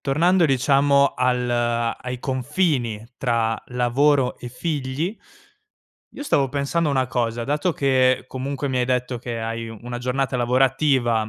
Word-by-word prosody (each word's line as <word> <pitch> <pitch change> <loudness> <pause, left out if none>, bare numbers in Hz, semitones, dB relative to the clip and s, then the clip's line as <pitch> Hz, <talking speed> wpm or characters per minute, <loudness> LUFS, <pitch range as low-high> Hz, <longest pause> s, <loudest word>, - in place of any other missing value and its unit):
tornando 170 +6 +3
diciamo 140 0 +3
al 125 -1 +1
ai 120 +1 -1
confini 130 - -1
tra 115 -3 0
lavoro 125 +2 +2
e 120 - -7
figli, 145 - -3 0.9
io - - -8
stavo 140 - +1
pensando 145 +4 -1
una 130 -2 +1
cosa: 120 -2 -2
dato 150 +7 0
che, 130 -4 +2
comunque, 135 +2 -4
mi 130 -1 -1
hai 125 - +2
detto 125 0 -1
che 115 -1 -5
hai 115 0 -4
u 115 -1 -9
una 120 0 -5
giornata 130 +1 -1
lavorativa 125 -2 +2
130 Hz, 140 wpm, -22 LUFS, 120-140 Hz, 0.9 s, tornando